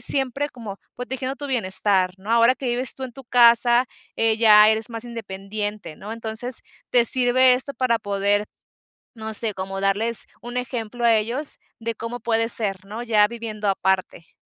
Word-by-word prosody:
siempre 275 +1 +1
como 220 -7 -9 0.2
protegiendo 260 +2 -5
tu 290 - -6
bienestar, 190 -6 +1
¿no? 200 +4 -5
Ahora 235 +2 +4
que 265 - -10
vives 245 +1 -1
tú 265 - -10
en 245 - -9
tu 270 0 -13
casa, 240 0 +4 0.3
eh, 225 -1 +1
ya 210 -2 +7
eres 220 +2 -1
más 230 0 -6
independiente, 205 -4 -6
¿no? 210 +3 -8
Entonces, 230 +2 -1 0.3
te 245 -1 +3
sirve 255 +1 +4
esto 260 +3 -2
para 240 -3 0
poder, 205 0 -1 0.7
no 220 -1 -6
sé, 215 -1 0
como 195 +1 -5
darles 210 +4 +1 0.2
un 240 +1 -7
ejemplo 240 -1 -5
a 230 -1 +5
ellos 235 +7 +1 0.2
de 230 0 -4
cómo 235 +2 -6
puede 230 0 0
ser, 195 -5 +3
¿no?, 215 +4 -7
ya 220 -3 +3
viviendo 220 -2 -6
aparte. 190 -3 -2
230 Hz, 170 wpm, -22 LUFS, 210-245 Hz, 0.7 s, ya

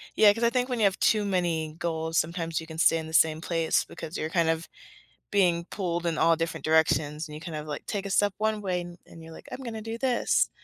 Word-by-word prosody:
Yeah, 205 -1 +7
'cause 230 +2 -4
I 235 - +5
think 250 +1 0
when 245 -2 -2
you - - +2
have 195 -1 +1
too 215 -2 +3
many 170 -5 -1
goals, 160 -1 -2
sometimes 165 0 -1
you 160 - -9
can 160 0 -9
stay 165 0 +4
in 160 -1 -5
the 160 - -9
same 160 -1 +4
place 165 -2 +1
because 160 - -7
you're 155 - -2
kind 165 -1 +2
of 165 +1 -1 0.6
being 175 -4 +2
pulled 175 -3 -3
in 165 - -1
all 165 0 +4
different 165 -2 -3
directions 155 -1 +2
and 150 - -9
you 155 - -9
kind 165 -2 -6
of 150 0 -6
like 150 - -6
take 200 -1 -3
a - - -6
step 205 0 +2
one 215 0 0
way 180 -2 -1
an 175 0 -9
and 165 - -13
you're 165 - -11
like, - - -13
"I'm - - -6
going 230 -2 -5
to 220 - -5
do 225 +1 -5
this." 255 -2 +2
170 Hz, 265 wpm, -27 LUFS, 160-200 Hz, 0.6 s, Yeah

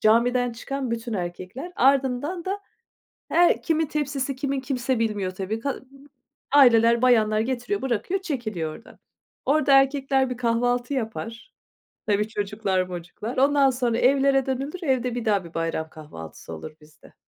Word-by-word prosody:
camiden 245 +3 +3
çıkan 265 +2 -4
bütün 235 0 -3
erkekler. 185 - -5
Ardından 275 +6 +2
da 395 +2 -3 0.7
her 345 0 +4
kimin 320 -1 +1
tepsisi 280 -2 -2
kimin, 275 0 -2
kimse 260 -2 -1
bilmiyor, 210 -4 -1
tabii. 195 +4 -4
Ka 275 +3 -3 0.7
aileler, 235 -4 +6
bayanlar 215 -4 +4
getiriyor, 260 - -2
bırakıyor, 265 - -1
çekiliyor 215 - -3
oradan. 230 - -17 0.5
Orada 285 0 +3
erkekler 270 -1 +1
bir 250 - -3
kahvaltı 245 +2 0
yapar. 230 - -5 0.5
Tabii, 210 0 +1
çocuklar 205 -3 -1
mocuklar, 180 +7 -6
ondan 275 0 +4
sonra 245 -2 0
evlere 270 0 +3
dönülür. 275 +7 -3
Evde 255 -5 0
bir 240 - -3
daha 205 -4 +1
bir 170 - -12
bayram 165 -1 -2
kahvaltısı 150 - -10
olur 80 - -8
bizde. 150 0 -19
245 Hz, 140 wpm, -24 LUFS, 215-275 Hz, 0.7 s, aileler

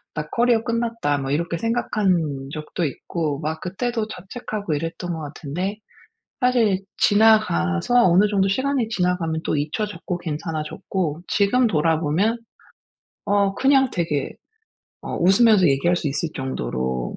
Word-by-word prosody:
나 150 0 -3
커리어 235 -1 +2
끝났다.' 230 -10 -1
뭐 135 0 -3
이렇게 170 +3 -1
생각한 180 - 0
적도 155 +3 -4
있고 150 0 -3
막 160 +1 -4
그때도 225 +4 -2
자책하고 205 -2 -5
이랬던 165 +3 -3
것 160 - -5
같은데 155 +7 -4 0.6
사실 240 -6 +3 0.2
지나가서 215 - +4
어느 185 +4 +5
정도 195 -1 +2
시간이 260 +2 0
지나가면 180 -6 -1
또 - - 0
잊혀졌고 175 +4 -3
괜찮아졌고 160 +1 -4
지금 225 +5 +3
돌아보면 165 +4 +1 0.9
어 200 -1 +2
그냥 270 +2 +3
되게 160 -6 -1 0.7
어 - - -5
웃으면서 195 +2 +5
얘기할 140 +6 +2
수 160 - -1
있을 145 +4 -2
정도로 65 - -3
180 Hz, 295 characters per minute, -22 LUFS, 150-215 Hz, 0.9 s, 어느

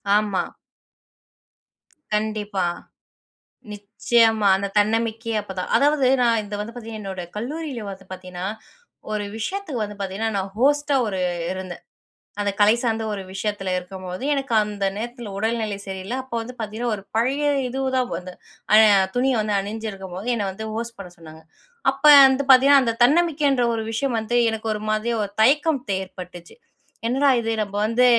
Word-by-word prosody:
ஆமா. 205 -3 +1 1.7
கண்டிப்பா. 210 -3 -1 1.1
நிச்சயமா 220 +1 +2
அந்த 200 +1 -2
தன்னம்பிக்கையே 225 +1 0
அப்பதான் 190 -2 -6
அதாவது 285 -2 +3
நான் 230 -2 +3
இது 205 0 -6
வந்து 215 +3 -5
பார்த்தீங்கன்னா, 225 -2 -7
என்னோட 190 -2 -5
கல்லூரியில 260 -1 -5
வந்து 195 0 -9
பார்த்தீங்கன்னா, 185 -1 -7 0.7
ஒரு 210 -1 -2
விஷயத்துக்கு 310 - -3
வந்து 210 0 -8
பார்த்தீங்கன்னா 200 +4 -2
நான் 190 0 -3
ஹோஸ்ட்டா 290 +2 +2
ஒரு 190 -3 -2 0.3
இருந்தேன். 185 -2 -7 0.6
அந்த 205 - 0
கலை 210 +1 +6
சார்ந்த 225 -2 -1
ஒரு 200 - -4
விஷயத்தில 195 -2 -2
இருக்கும்போது 185 +2 -8
எனக்கு 270 -3 -2
அந்த 205 -1 -3
நேரத்தில 235 -1 -6
உடல்நிலை 220 -1 -1
சரியில்ல 190 +4 -5
அப்போ 260 -2 -7
வந்து 245 +3 -8
பார்த்தீங்கன்னா, 220 +2 -2
ஒரு 195 - -11
பழைய 265 +6 +1 0.2
இதுதான் 260 -1 -1
வந்து 180 +1 -8 0.4
அ 215 - +9 0.4
துணி 255 +2 +2
வந்து 210 -1 -1
அணிஞ்சிருக்கும்போது 195 -1 -6
என்னை 205 -3 -2
வந்து 220 +3 -7
ஹோஸ்ட் 230 0 -5
பண்ண 180 -3 -9
சொன்னாங்க. 160 -1 -13 0.5
அப்போ 275 +3 +4 0.2
வந்து 265 +1 +1
பார்த்திங்கன்னா, 275 +2 +7
அந்த 230 - 0
தன்னம்பிக்கைன்ற 285 -3 +3
ஒரு 225 - -3
விஷயம் 235 +1 -1
வந்து 230 +2 -1
எனக்கு 220 0 -5
ஒரு 210 - -6
மாதிரி 220 +2 0
ஒரு 200 - -5
தே - - +7
தயக்கம் 290 +3 +3 0.2
ஏற்பட்டுச்சு 180 -2 -10 0.5
என்னடா 270 +4 +3
இது 225 - -2
நம்ம 200 -1 -4
வந்து 230 +3 +3
220 Hz, 145 wpm, -22 LUFS, 195-245 Hz, 1.7 s, அ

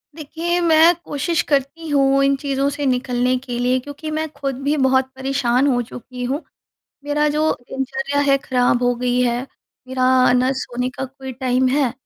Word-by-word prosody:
देखिए, 330 +3 -2
मैं 330 0 +6
कोशिश 325 +4 -1
करती 285 +4 0
हूँ 275 -1 +3
इन 275 0 +3
चीज़ों 275 0 -1
से 285 0 -4
निकलने 250 -1 +1
के 250 -1 -6
लिए 250 +1 +2
क्योंकि 290 +4 -8
मैं 315 +1 -2
खुद 275 -3 -4
भी 290 +2 +1
बहुत 265 -1 +3
परेशान 265 -1 +1
हो 245 -3 +2
चुकी 250 +1 -8
हूँ। 270 +5 -2 0.6
मेरा 295 +1 +1
जो 305 +1 +1 0.2
दिनचर्या 270 +2 -2
है 275 - +5
खराब 245 -1 +1
हो 245 0 +2
गई 250 0 0
है, 240 -1 +1 0.5
मेरा 255 -1 +3
ना 250 +1 +2
सोने 250 -1 -3
का 265 - -5
कोई 265 0 -9
टाइम 255 0 +1
है, 265 -2 +1
265 Hz, 175 wpm, -20 LUFS, 250-285 Hz, 0.6 s, मैं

